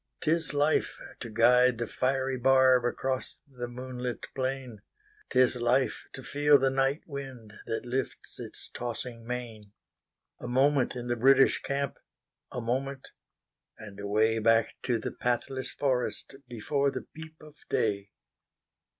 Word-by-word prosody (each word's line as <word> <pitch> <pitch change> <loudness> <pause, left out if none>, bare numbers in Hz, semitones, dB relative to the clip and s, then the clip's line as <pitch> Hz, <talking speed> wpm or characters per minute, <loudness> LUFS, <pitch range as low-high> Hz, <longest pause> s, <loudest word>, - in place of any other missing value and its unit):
'T 155 - +1
is 165 -1 +1
life 145 +2 +1 0.2
to 120 - -6
guide 125 +2 +5
the 120 - -2
fiery 130 +1 0
barbAcross 130 0 +2
the 125 -3 -6
moonlit 125 0 -5
plain;'T 135 - -5
is 130 0 +5
life 125 +2 +1
to 135 - -9
feel 145 +1 +4
the 135 0 +2
night 135 +2 +1
windThat 125 -7 -6
lifts 130 +2 -4
his - - -9
tossing 120 -1 -5
mane.A 115 -2 -9
moment 130 +1 +2
in 120 -1 -5
the 120 0 0
British 135 +3 +5
camp—A 140 -2 -6
moment—and 125 -4 -7
awayBack 110 +2 +3
to 125 -2 0
the 110 - -4
pathless 130 +2 -2
forest, 130 -1 -1
Before 140 +4 0
the - - -5
peep 160 0 -10
of 150 0 -15
day. 100 -2 0
125 Hz, 120 wpm, -29 LUFS, 120-135 Hz, 0.2 s, guide